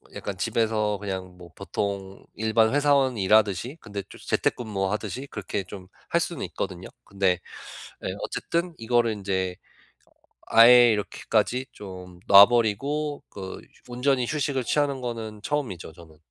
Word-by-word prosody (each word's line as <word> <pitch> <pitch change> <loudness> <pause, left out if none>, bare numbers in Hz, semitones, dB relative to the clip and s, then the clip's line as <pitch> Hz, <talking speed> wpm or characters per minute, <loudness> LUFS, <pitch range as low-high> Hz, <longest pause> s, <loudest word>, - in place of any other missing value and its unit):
약간 - - -5
집에서 110 -2 0
그냥 95 -2 -6
뭐 90 -2 -13
보통 100 -1 -4
일반 110 +1 +2
회사원이 140 -6 +2
일하듯이 105 - +2
근데 100 -1 -6
좀 - - -12
재택근무 100 -5 -1
하듯이 110 +6 -4
그렇게 105 -4 -4
좀 95 -3 -10 0.2
할 - - +2
수는 - - -3
있거든요. 95 0 -5 0.2
근데 95 -2 +1 0.7
예 - - -2
어쨌든 170 +1 -2
이거를 120 0 +1
인제 95 -3 -2 1.0
아예 120 +1 +8
이렇게까지 110 +4 -1
좀 90 -3 -10
놔 100 0 +11
버리고 140 +6 0
그 95 -2 -8 0.2
휴 125 - -10
온전히 125 0 +1
휴식을 140 -3 -1
취하는 140 -1 0
거는 110 -3 -5
처음이죠, 115 - -3
저는. 80 -1 -16
110 Hz, 305 characters per minute, -25 LUFS, 95-125 Hz, 1.0 s, 놔